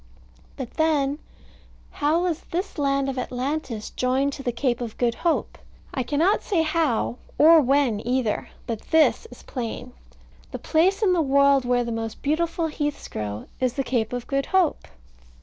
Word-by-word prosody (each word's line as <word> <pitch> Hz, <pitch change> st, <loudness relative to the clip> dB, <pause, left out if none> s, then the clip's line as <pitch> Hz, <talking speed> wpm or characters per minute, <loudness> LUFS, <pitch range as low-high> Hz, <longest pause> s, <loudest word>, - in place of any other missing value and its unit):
But 260 Hz, -4 st, -6 dB
then, 295 Hz, -3 st, +1 dB, 0.7 s
how 310 Hz, +4 st, +1 dB
was 345 Hz, -3 st, -1 dB
this 360 Hz, -1 st, -3 dB
land 275 Hz, -1 st, +1 dB
of 270 Hz, -1 st, -2 dB
Atlantis 255 Hz, -2 st, -3 dB
joined 265 Hz, +3 st, 0 dB
to 275 Hz, -, -7 dB
the 250 Hz, -3 st, -1 dB
Cape 240 Hz, 0 st, -1 dB
of 230 Hz, -3 st, -5 dB
Good 240 Hz, -1 st, +1 dB
Hope? 335 Hz, +7 st, -1 dB, 0.3 s
I 265 Hz, -, -1 dB
cannot 305 Hz, -, +2 dB
say 350 Hz, -6 st, +1 dB
how, 310 Hz, -7 st, 0 dB, 0.2 s
or 320 Hz, +1 st, +7 dB
when 270 Hz, -5 st, +2 dB
either. 245 Hz, -2 st, -1 dB, 0.2 s
But 225 Hz, -2 st, -4 dB
this 320 Hz, +7 st, +3 dB
is -, -, -14 dB
plain: 235 Hz, -4 st, -5 dB, 0.6 s
the -, -, -5 dB
place 375 Hz, +7 st, +2 dB
in 375 Hz, -3 st, +4 dB
the 345 Hz, -, +2 dB
world 280 Hz, -2 st, +4 dB
where 245 Hz, 0 st, +2 dB
the 235 Hz, -, -4 dB
most 225 Hz, -1 st, -5 dB
beautiful 330 Hz, +3 st, 0 dB
heaths 295 Hz, -2 st, -3 dB
grow 105 Hz, 0 st, -5 dB
is 255 Hz, -2 st, +1 dB
the 275 Hz, -, -1 dB
Cape 235 Hz, -3 st, -1 dB
of 245 Hz, -1 st, -4 dB
Good 275 Hz, 0 st, -1 dB
Hope? 375 Hz, -5 st, +1 dB
275 Hz, 165 wpm, -24 LUFS, 245-315 Hz, 0.7 s, or